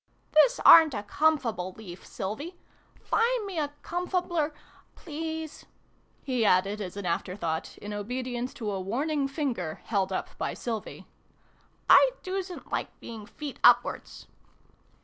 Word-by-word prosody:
" - - -40
This 485 +11 +6
aren't 320 -5 +9
a 205 - -3
comfable 230 - 0
leaf, 185 -5 -10
Sylvie. 285 - -5 0.4
Find 465 -1 +1
me 380 -5 -4
a 290 -1 -1
comfabler 350 -3 -1 0.4
please! 320 -1 -6 0.3
" - - -38
he 255 -4 0
added, 200 +1 +2
as 190 0 -6
an 200 - -5
after 180 +1 -2
thought, 160 -5 -3
in 205 0 -7
obedience 245 +4 -3
to 215 -4 -3
a 195 -1 -3
warning 275 +8 -1
finger 255 - -3
held 195 -3 0
up 185 - -4
by - - -2
Sylvie. 225 -3 -5 0.4
" - - -36
I - - +7
doosn't 375 -1 -5
like - - -3
being 220 -3 -9
feet 290 +1 -8
upwards 245 0 +3
250 Hz, 145 wpm, -28 LUFS, 205-320 Hz, 0.4 s, aren't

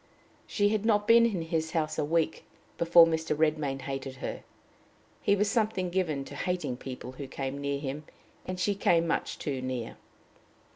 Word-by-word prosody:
She 205 -1 +2
had 215 -1 0
not 210 -2 +2
been 230 0 +7
in 190 -7 -2
his 160 -1 -2
house 155 -1 -1
a - - +2
week 160 +1 0 0.4
before 170 0 +7
Mr. 160 -2 -1
Redmain 150 -3 0
hated 135 -1 -5
her. 135 - -5 0.8
He 200 - +3
was 205 +1 +1
something 210 -5 0
given 160 -7 -1
to - - -10
hating 180 -9 -2
people 130 -1 -7
who 135 +1 -8
came 135 +1 -4
near 140 0 -1
him, 145 +2 -5 0.4
and 185 0 -5
she 205 +2 +2
came 170 -4 +2
much 165 - -1
too 135 -3 -3
near. 130 -3 -4
160 Hz, 175 wpm, -29 LUFS, 140-185 Hz, 0.8 s, been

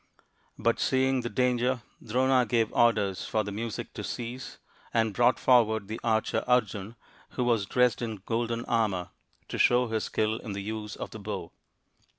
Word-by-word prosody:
But, 115 +1 +1
seeing 130 0 +2
the 120 - -3
danger, 125 +1 +1 0.2
Drona 130 +3 +3
gave 115 -1 +1
orders 105 -5 +2
for 110 - 0
the 100 - -5
music 110 +2 -5
to - - -6
cease, 120 +2 -6 0.3
and 115 -2 +1
brought 120 +4 +4
forward 110 -5 +3
the 110 +2 -5
archer 110 -2 +1
Arjun, 110 -3 +1 0.4
who 125 - +2
was 115 -5 +1
dressed 125 +1 +2
in 110 -5 -4
golden 115 0 -1
armour, 105 -7 0 0.4
to - - -5
show 125 -1 +4
his 110 -1 -1
skill 110 0 0
in 105 - -6
the 100 - -4
use 110 0 -5
of - - -6
the 110 - -8
bow. 100 -4 -5
115 Hz, 165 wpm, -28 LUFS, 105-125 Hz, 0.4 s, brought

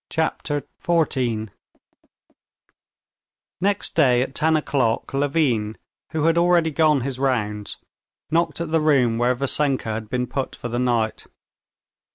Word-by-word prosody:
Chapter 150 -3 -2
14 125 - 0 2.1
Next 200 +2 0
day 125 -6 +4
at 135 - -7
ten 160 +1 +2
o'clock 130 -7 -1
Levin, 135 -7 0 0.3
who 155 -2 -1
had 165 +1 +3
already 170 -2 +3
gone 155 -2 +3
his 130 0 -4
rounds, 105 -6 -1 0.5
knocked 165 0 +1
at 170 -2 -4
the 160 -1 +2
room 130 -7 +3
where 125 +1 +2
Vassenka 140 -1 0
had 110 0 -5
been 125 +1 -1
put 135 +1 -4
for 120 - -6
the 120 +1 -2
night. 120 -3 0
135 Hz, 130 wpm, -22 LUFS, 120-160 Hz, 2.1 s, day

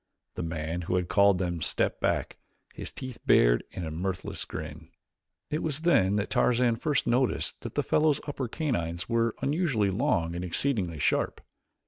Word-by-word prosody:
The - - -5
man 80 +1 -3
who 90 +1 -1
had 90 -1 -1
called 100 -2 +5
them 85 -2 -2
stepped - - 0
back, - - -1 0.3
his - - -7
teeth 130 -2 -7
bared - - +5
in 90 - -6
a 80 - -4
mirthless 90 +3 -3
grin. 75 +1 -7 0.6
It 150 - -1
was 155 -1 -1
then 105 - +3
that 105 -1 -1
Tarzan 120 -1 +3
first 145 +3 0
noticed 125 +1 0
that - - -7
the - - +1
fellow's 150 -2 +2
upper 140 -3 -3
canines 85 - -2
were 115 -1 +1
unusually 140 - +1
long 95 - +1
and 85 - -3
exceedingly 90 - 0
sharp. 65 - +1
100 Hz, 165 wpm, -28 LUFS, 85-130 Hz, 0.6 s, called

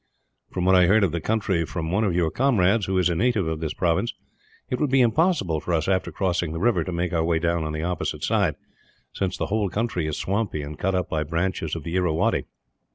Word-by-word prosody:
"From 90 -1 -2
what 95 - +5
I 90 -2 +6
heard 105 +3 +4
of 95 - +2
the 85 0 -3
country 100 -4 0
from 80 0 -4
one 100 +4 +1
of 95 -5 +1
your 85 -3 +1
comrades, 110 -6 +2
who 95 0 0
is 90 -2 +3
a 90 - +1
native 110 0 +1
of 80 -1 -2
this 80 -1 -3
province, 90 +7 0 0.5
it 125 - -2
would 150 - +1
be 135 +1 +3
impossible 120 - +2
for 85 - -3
us, 80 -1 -1
after 95 -1 0
crossing 85 -4 -1
the 80 - -4
river, 95 -4 +2
to 90 - -5
make 85 0 -2
our 80 -1 +2
way 85 0 +1
down 85 0 0
on 80 - -3
the 80 +1 -3
opposite 90 -1 -3
side, - - +1 0.6
since 95 -2 -2
the - - -1
whole 105 -3 +1
country 100 -6 -1
is 75 - -3
swampy 100 -6 -2
and 75 +1 -8
cut 95 +1 0
up 90 - 0
by 80 - -1
branches 85 0 -2
of 80 - -6
the 85 +3 -4
Irrawaddy. 85 -4 +1
90 Hz, 240 wpm, -24 LUFS, 80-100 Hz, 0.6 s, I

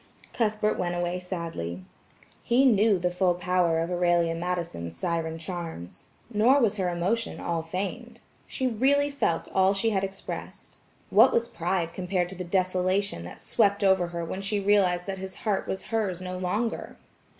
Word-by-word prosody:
Cuthbert 215 -2 0
went 175 -1 -1
away 175 +1 -1
sadly. 165 - -5 0.6
He 250 +3 +3
knew 215 -4 +5
the 180 0 0
full 180 0 +2
power 175 -2 +1
of 165 +2 -2
Aurelia 175 -1 +2
Madison's 165 - -4
siren 165 - -2
charms. 165 - -7 0.3
Nor 240 +7 +5
was 215 -5 +2
her 185 -2 0
emotion 190 +7 -1
all 170 -1 -1
feigned. 185 +5 -5 0.3
She 260 - -2
really 275 +5 +2
felt 170 -12 0
all 190 +1 +4
she 225 +3 +1
had 195 -2 0
expressed. 195 0 -7 0.4
What - - +7
was 235 0 +1
pride 175 -3 -2
compared 180 -1 -1
to 190 - -7
the 180 - -5
desolation 185 - 0
that 90 - -10
swept 200 -2 +2
over 190 -2 +4
her 170 -1 -4
when 185 +4 -4
she 200 +1 -1
realized 195 -3 +3
that 195 -1 -4
his 190 0 -7
heart 205 -3 0
was 190 - -3
hers 200 -6 0
no 185 0 -5
longer? 195 +6 -2
185 Hz, 165 wpm, -27 LUFS, 175-205 Hz, 0.6 s, What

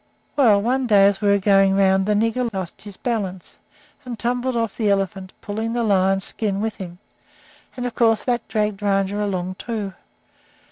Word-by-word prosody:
"Well, 230 -8 +5
one 255 +2 0
day 200 -3 +6
as 200 -1 +2
they 210 - 0
were 200 0 +5
going 195 -1 +4
around 190 0 +3
the 210 - +2
nigger 230 +3 0
lost 190 -4 -6
his 205 -2 -9
balance 195 -7 -4 0.4
and 245 -3 -6
tumbled 245 +3 -1
off 230 -3 -1
the 215 -3 0
elephant, 195 -1 -1
pulling 220 +2 -3
the 240 0 0
lion's 195 -2 +2
skin 200 -3 -2
with 220 0 -3
him, 175 -2 -8 0.8
and 250 - -3
of 245 - -3
course 225 -2 +2
that 240 -2 -1
dragged 210 -1 -1
Rajah 200 0 0
along, 185 -2 -3
too. 215 -5 -4
205 Hz, 180 wpm, -21 LUFS, 195-230 Hz, 0.8 s, day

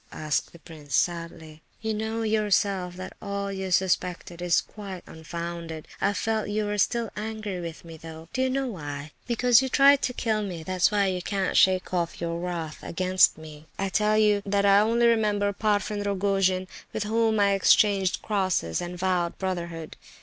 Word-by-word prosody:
asked 155 -2 -2
the - - -14
prince, 150 -4 -7
sadly. 165 -2 -2 0.2
"You 220 -1 -2
know 220 +1 -2
yourself 200 -4 +1
that 185 +1 -7
all 200 -1 -3
you 190 -1 -4
suspected 180 -1 0
is 175 -1 +3
quite 195 -4 -8
unfounded. 170 0 -7
I 200 +1 +2
felt 215 +2 -1
you 210 +1 -1
were 205 0 -2
still 235 +1 +1
angry 215 -3 -4
with 170 0 -7
me, 165 -1 -10
though. 160 0 -10
Do 260 - 0
you 260 - +2
know 270 +1 0
why? 150 - -6 0.2
Because 245 0 +4
you 265 - -2
tried 275 +1 +6
to - - 0
kill 220 -3 0
me—that's 185 -1 0
why 205 -1 +2
you 185 -1 -1
can't 195 0 -1
shake 185 -1 +3
off 170 -2 -1
your 170 0 -3
wrath 170 -3 -4
against 185 +2 +3
me. 155 -1 -12
I 195 0 -1
tell 210 +2 +2
you 210 -1 +4
that 200 0 +1
I 200 0 +6
only 230 +3 +3
remember 210 -3 +2
the 200 - -16
Parfen 210 -1 0
Rogojin 195 -2 +1 0.3
with 220 - -1
whom 220 0 +1
I 200 0 +4
exchanged 195 -1 +3
crosses, 185 - 0
and 175 0 -5
vowed 180 -2 0
brotherhood. 170 -4 -4
190 Hz, 180 wpm, -26 LUFS, 170-210 Hz, 0.3 s, tried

